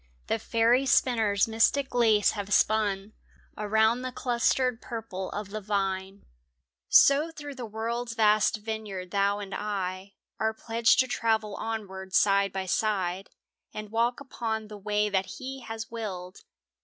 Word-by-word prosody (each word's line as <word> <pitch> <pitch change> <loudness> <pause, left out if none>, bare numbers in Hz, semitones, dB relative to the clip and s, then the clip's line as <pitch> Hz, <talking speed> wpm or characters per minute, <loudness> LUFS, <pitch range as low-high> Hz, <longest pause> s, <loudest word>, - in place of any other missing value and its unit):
The 225 - -1
fairy 235 +4 +2
spinners 220 -6 +3
mystic 230 +5 +2
lace 220 -4 +4
have 205 -1 -6
spun 205 -1 +2 0.4
Around 220 +3 +2
the 255 0 -4
clustered 250 0 0
purple 220 -5 -5
of 205 -1 -6
the 215 +1 -4
vine. 195 -1 -2 0.6
So 285 +4 +6
through 290 -3 -8
the 245 -3 -7
world's 230 +2 -3
vast 215 -1 +3
vineyard 210 -4 -6
thou 200 0 +2
and 200 -1 -7
I 195 -2 -4 0.2
Are 220 0 0
pledged 230 +1 +2
to 255 - -2
travel 220 -3 0
onward 190 -4 -5
side 200 -1 +4
by 190 0 -3
side 190 -1 -1 0.5
And 215 -1 -6
walk 235 +2 +1
upon 220 -5 -4
the 210 - -8
way 210 +1 0
that 190 -2 -1
He 265 +1 -6
has 225 -2 -7
willed. 190 -5 -6
215 Hz, 145 wpm, -28 LUFS, 200-230 Hz, 0.6 s, So